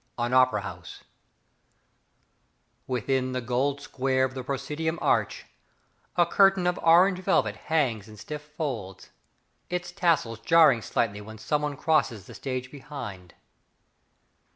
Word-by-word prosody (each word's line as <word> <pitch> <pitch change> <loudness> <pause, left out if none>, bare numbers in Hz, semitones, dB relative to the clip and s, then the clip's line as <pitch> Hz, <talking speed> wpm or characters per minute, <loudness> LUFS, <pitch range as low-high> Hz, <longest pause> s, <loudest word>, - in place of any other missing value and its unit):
III 120 - +1
An 120 - -3
Opera 130 -5 +4
House 90 -4 -9 1.8
Within 130 +1 -1
the 130 - -1
gold 130 +4 -1
square 130 -1 0
of 130 - -5
the 130 -1 -5
proscenium 150 +5 -3
arch, - - 0 0.7
A 175 - +4
curtain 195 +1 +4
of 180 0 0
orange 180 +3 +5
velvet 110 - +1
hangs 120 -7 -1
in 105 -1 -13
stiff 150 +8 -7
folds, 140 - -6 0.6
Its 180 0 -3
tassels 165 - +1
jarring 145 -1 +5
slightly 105 -2 -1
when 110 +1 -10
someone 145 +6 -2
crosses 135 - +1
the - - -12
stage 130 -1 -5
behind. 125 - -9
130 Hz, 130 wpm, -27 LUFS, 115-155 Hz, 1.8 s, orange